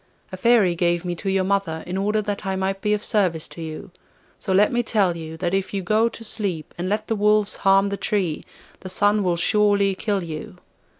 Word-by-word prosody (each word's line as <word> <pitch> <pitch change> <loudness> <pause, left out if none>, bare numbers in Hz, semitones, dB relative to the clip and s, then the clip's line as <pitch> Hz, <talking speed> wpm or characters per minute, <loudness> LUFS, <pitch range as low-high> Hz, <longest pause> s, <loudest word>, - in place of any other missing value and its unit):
A - - -5
Fairy 205 -2 +4
gave 175 0 0
me 175 - -1
to 195 - -3
your 190 0 +1
mother 190 -4 -1
in 180 - -5
order 210 +2 0
that 205 0 -4
I 190 -1 -2
might 190 +1 -2
be 210 0 +2
of 210 - -6
service 180 -7 0
to 170 - -9
you; 160 +3 -7 0.5
so - - -4
let 200 +3 +4
me 240 - +1
tell 200 -7 +1
you, 160 -1 -7
that 175 +1 -2
if 195 +1 -1
you 195 - -2
go 215 +5 +2
to 230 - -11
sleep 195 -8 -2
and 175 +1 -3
let 210 +1 -1
the 225 - -1
wolves 210 0 +2
harm 195 +1 +3
the 200 - -3
tree, 185 -8 -1 0.4
the 185 - -8
Sun 205 +3 +2
will 180 -3 0
surely 200 +2 +3
kill 200 0 -2
you. 170 +5 -7
195 Hz, 225 wpm, -23 LUFS, 175-210 Hz, 0.5 s, Fairy